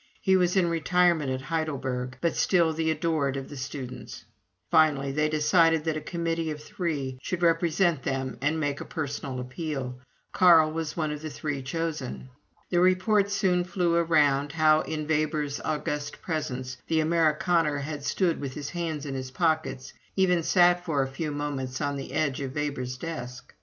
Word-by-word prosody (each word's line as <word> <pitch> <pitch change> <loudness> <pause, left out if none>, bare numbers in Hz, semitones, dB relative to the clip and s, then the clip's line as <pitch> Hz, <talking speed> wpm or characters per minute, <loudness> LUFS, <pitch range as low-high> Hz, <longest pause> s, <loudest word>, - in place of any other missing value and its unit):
He 190 - +3
was 180 0 +2
in 180 -2 +4
retirement 170 -2 +2
at 130 0 -2
Heidelberg, 135 -5 -3
but 170 - +1
still 170 -4 +3
the 160 0 0
adored 155 -3 0
of 135 - -6
the 145 - -8
students. 130 -2 -7 0.5
Finally, 150 -4 +4
they 150 +2 +1
decided 160 +1 +3
that 160 -1 -1
a 155 - -3
committee 165 -1 -2
of 150 -1 -4
three 150 -5 -3
should 180 +3 -3
represent 165 -1 +2
them 135 -1 -2
and 150 +3 +1
make 145 -2 -1
a - - -6
personal 140 -4 -4
appeal. 130 -1 -4 0.3
Carl 165 -4 +6
was 160 0 -4
one 155 -2 0
of 150 0 -5
the 155 - -5
three 145 -1 -4
chosen. 145 -2 -4 0.4
The 175 - +3
report 190 +3 +3
soon 180 -3 +2
flew 180 -2 0
around, 145 -4 +3
how, 155 -1 +5
in 155 -1 -4
Weber's 150 -2 0
august 150 -1 -3
presence, 130 -6 -3
the 160 -1 +2
Amerikaner 160 -1 +2
had 145 0 -5
stood 170 +2 0
with 135 -2 -5
his 145 -1 -5
hands 160 -4 -3
in 140 - -4
his 130 -1 -4
pockets 155 -3 -1 0.2
even 180 -3 +3
sat 175 +1 +4
for 145 -6 +1
a - - -2
few 145 +4 -4
moments 145 -3 -3
on 145 -1 -1
the 135 - -6
edge 145 -2 0
of 135 -1 -5
Weber's 135 -4 -3
desk. 125 -5 -7
155 Hz, 175 wpm, -27 LUFS, 140-165 Hz, 0.5 s, Carl